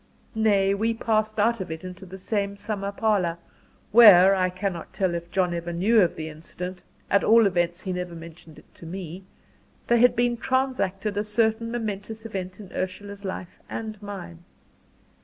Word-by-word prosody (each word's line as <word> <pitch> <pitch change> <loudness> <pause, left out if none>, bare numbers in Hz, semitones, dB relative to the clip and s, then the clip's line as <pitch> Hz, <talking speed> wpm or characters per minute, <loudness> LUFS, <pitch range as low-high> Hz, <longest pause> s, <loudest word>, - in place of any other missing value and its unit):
Nay, 205 -3 +3
we 225 +3 0
passed 215 -1 0
out 230 +2 +2
of 185 - -5
it 160 +1 -6
into 185 +1 -9
the 190 +2 -9
same 200 0 -2
summer 200 -1 -3
parlour, 200 -5 0 0.5
where 200 -4 +9
I 185 -1 +2
cannot 185 -2 -4
tell 190 -3 0
if 170 0 -5
John 180 -1 +1
ever 170 0 -4
knew 205 +6 +3
of 175 - +2
the 160 -1 -5
incident, 180 +4 -8 0.3
at 200 - +4
all 230 0 +6
events 175 -2 0
he 185 - -3
never 180 -1 -4
mentioned 165 -1 -12
it - - -19
to 165 - -12
me 185 +1 -7 0.6
there 235 0 +3
had 245 +1 +5
been 240 0 +1
transacted 225 -7 -1
a 205 - +1
certain 220 +1 0
momentous 220 -1 -5
event 185 -3 -5
in 200 -4 -11
Ursula's 200 +2 -5
life 185 -2 -6
and 215 -2 -6
mine. 195 - -8
195 Hz, 175 wpm, -25 LUFS, 180-220 Hz, 0.6 s, where